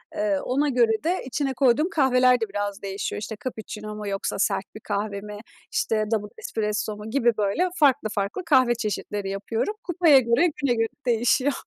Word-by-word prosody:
Iıı, 205 Hz, -2 st, 0 dB
ona 285 Hz, +4 st, +1 dB
göre 235 Hz, -3 st, +2 dB
de 350 Hz, +4 st, 0 dB
içine 270 Hz, +1 st, -2 dB
koyduğum 265 Hz, +5 st, +3 dB
kahveler 255 Hz, -6 st, +3 dB
de 225 Hz, -, -1 dB
biraz 205 Hz, 0 st, -3 dB
değişiyor. 195 Hz, +1 st, -4 dB
İşte 215 Hz, +1 st, -5 dB
cappuccino 215 Hz, -3 st, -6 dB
mu 210 Hz, -1 st, -6 dB
yoksa 195 Hz, 0 st, -3 dB
sert 195 Hz, -1 st, -1 dB
bir -, -, -7 dB
kahve 200 Hz, -1 st, -3 dB
mi, 210 Hz, 0 st, -8 dB, 0.3 s
İşte 215 Hz, -1 st, 0 dB
double 210 Hz, -2 st, -1 dB
espresso 215 Hz, -, -3 dB
mu 210 Hz, +1 st, -8 dB
gibi 240 Hz, 0 st, +3 dB
böyle 215 Hz, -, +1 dB
farklı 280 Hz, -8 st, +3 dB
farklı 205 Hz, -, -2 dB
kahve 255 Hz, -6 st, +4 dB
çeşitleri 210 Hz, -3 st, -3 dB
yapıyorum. 215 Hz, -, -2 dB
Kupaya 340 Hz, -6 st, +5 dB
göre 250 Hz, +8 st, +2 dB
güne 275 Hz, -3 st, +2 dB
göre 225 Hz, 0 st, +1 dB, 0.2 s
değişiyor. 245 Hz, +4 st, +2 dB
225 Hz, 175 wpm, -24 LUFS, 210-265 Hz, 0.3 s, Kupaya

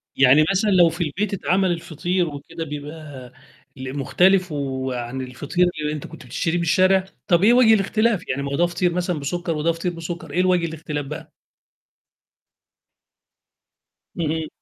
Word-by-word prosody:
يعني 135 Hz, +3 st, +6 dB
مثلًا 200 Hz, +2 st, +1 dB
لو 175 Hz, -3 st, +6 dB
في 170 Hz, +2 st, -3 dB
البيت 190 Hz, +7 st, -2 dB
اتعمل 190 Hz, -1 st, +1 dB
الفطير 175 Hz, +1 st, -1 dB
وكده 145 Hz, +3 st, -7 dB
بيبقى 145 Hz, -3 st, -8 dB, 0.4 s
ل 130 Hz, +1 st, -6 dB
مختلف 180 Hz, +5 st, +3 dB
وعن 130 Hz, -3 st, -3 dB
الفطير 145 Hz, +8 st, 0 dB
اللي 150 Hz, -, -1 dB
أنت 150 Hz, -, -6 dB
كنت 165 Hz, -4 st, -12 dB
بتشتريه 165 Hz, +7 st, -2 dB
من -, -, -1 dB
الشارع؟ 185 Hz, +2 st, +3 dB, 0.2 s
طَب 175 Hz, 0 st, +3 dB
إيه 230 Hz, +4 st, +6 dB
وجه 240 Hz, -3 st, +6 dB
الاختلاف، 215 Hz, 0 st, +1 dB
يعني 140 Hz, +2 st, -1 dB
ما 140 Hz, -, -4 dB
هو -, -, -1 dB
ده 175 Hz, +4 st, +3 dB
فطير 175 Hz, 0 st, 0 dB
مثلًا 180 Hz, -2 st, -1 dB
بسُكّر 170 Hz, +3 st, -3 dB
وده 160 Hz, +2 st, +1 dB
فطير 165 Hz, +2 st, -3 dB
بسُكّر، 165 Hz, -2 st, -7 dB
إيه 175 Hz, -, -1 dB
الوجه 180 Hz, -2 st, +2 dB
الاختلاف 155 Hz, -2 st, -5 dB
بقى؟ 150 Hz, +2 st, -8 dB, 2.8 s
اهم. 160 Hz, -1 st, -2 dB
165 Hz, 155 wpm, -22 LUFS, 145-180 Hz, 2.8 s, يعني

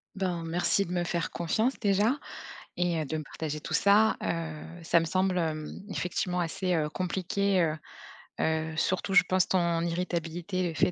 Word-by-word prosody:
Ben, 180 Hz, -3 st, -1 dB
merci 175 Hz, +4 st, +1 dB
de 175 Hz, -, -8 dB
me 175 Hz, -1 st, 0 dB
faire 170 Hz, -1 st, -2 dB
confiance 220 Hz, +10 st, 0 dB
déjà 210 Hz, +6 st, +2 dB, 0.6 s
et 175 Hz, -2 st, +1 dB
heu, 155 Hz, -, -1 dB
de 155 Hz, -, -3 dB
me 155 Hz, -, -4 dB
partager 150 Hz, +1 st, -5 dB
tout -, -, -6 dB
ça. 210 Hz, +2 st, +5 dB
Heu, 160 Hz, -2 st, -3 dB, 0.2 s
ça 170 Hz, +1 st, +4 dB
me 165 Hz, -, -1 dB
semble, 185 Hz, +2 st, +1 dB
hem, 155 Hz, -2 st, -2 dB
effectivement 180 Hz, -1 st, -1 dB
assez, 180 Hz, +2 st, -1 dB
heu, 155 Hz, -2 st, 0 dB
compliqué, 185 Hz, +2 st, 0 dB
heu, 160 Hz, -1 st, +1 dB, 0.7 s
heu, 160 Hz, 0 st, 0 dB
surtout 185 Hz, +4 st, 0 dB
je 200 Hz, -, +8 dB
pense 185 Hz, 0 st, +3 dB
ton 170 Hz, -2 st, +2 dB
irritabilité, 175 Hz, +1 st, -2 dB
le 165 Hz, -, -3 dB
fait 180 Hz, -, +2 dB
175 Hz, 175 wpm, -29 LUFS, 165-185 Hz, 0.7 s, je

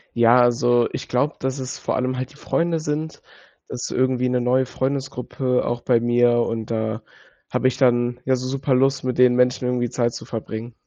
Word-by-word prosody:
Ja, 120 Hz, +1 st, +5 dB
also, 120 Hz, 0 st, +3 dB
ich -, -, -6 dB
glaube, 140 Hz, +5 st, 0 dB
dass 130 Hz, +1 st, -3 dB
es 130 Hz, 0 st, -5 dB
vor -, -, -2 dB
allem 130 Hz, 0 st, -1 dB
halt 130 Hz, +2 st, -4 dB
die -, -, -19 dB
Freunde 165 Hz, +2 st, -1 dB
sind. 155 Hz, +1 st, -4 dB, 0.5 s
Das 125 Hz, -, -6 dB
ist -, -, -4 dB
irgendwie 130 Hz, 0 st, +1 dB
'ne 125 Hz, 0 st, 0 dB
neue 130 Hz, +2 st, +2 dB
Freundesgruppe 130 Hz, -1 st, -2 dB
auch 120 Hz, 0 st, -2 dB
bei 120 Hz, -1 st, +2 dB
mir 120 Hz, 0 st, +3 dB
und 115 Hz, -1 st, -3 dB
da 110 Hz, 0 st, -2 dB, 0.5 s
habe 130 Hz, -, +1 dB
ich 130 Hz, -, -1 dB
dann 120 Hz, -2 st, +2 dB
ja 130 Hz, 0 st, +2 dB
so 130 Hz, 0 st, -4 dB
super 135 Hz, 0 st, -1 dB
Lust, 135 Hz, +1 st, +2 dB
mit 125 Hz, -1 st, -2 dB
den 125 Hz, -1 st, +5 dB
Menschen 125 Hz, 0 st, +2 dB
irgendwie 125 Hz, -1 st, 0 dB
Zeit 120 Hz, 0 st, -1 dB
zu -, -, -8 dB
verbringen. 115 Hz, +1 st, -6 dB
125 Hz, 205 wpm, -22 LUFS, 120-130 Hz, 0.5 s, Ja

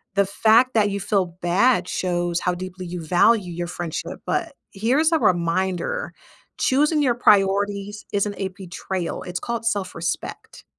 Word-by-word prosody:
The 200 Hz, -, +4 dB
fact 225 Hz, +6 st, +3 dB
that 210 Hz, -2 st, +4 dB
you 200 Hz, 0 st, -3 dB
feel 195 Hz, -2 st, +1 dB
bad 180 Hz, +2 st, +3 dB
shows 175 Hz, -1 st, -1 dB
how 180 Hz, 0 st, -1 dB
deeply 185 Hz, 0 st, -7 dB
you 170 Hz, -2 st, -6 dB
value 180 Hz, +2 st, +3 dB
your 175 Hz, 0 st, -4 dB
friendship, 175 Hz, -2 st, -5 dB
but -, -, -2 dB, 0.2 s
here's 260 Hz, -, +2 dB
a 320 Hz, -, +3 dB
reminder, 185 Hz, -, 0 dB, 0.5 s
choosing 295 Hz, +3 st, +2 dB
your 245 Hz, -3 st, +2 dB
priorities 200 Hz, -1 st, +2 dB
isn't 205 Hz, 0 st, 0 dB
a 195 Hz, -1 st, -2 dB
betrayal, 185 Hz, -1 st, -5 dB
it's 180 Hz, 0 st, -4 dB
called 235 Hz, -1 st, -4 dB
self-respect. 185 Hz, -6 st, -3 dB
195 Hz, 145 wpm, -23 LUFS, 180-220 Hz, 0.5 s, The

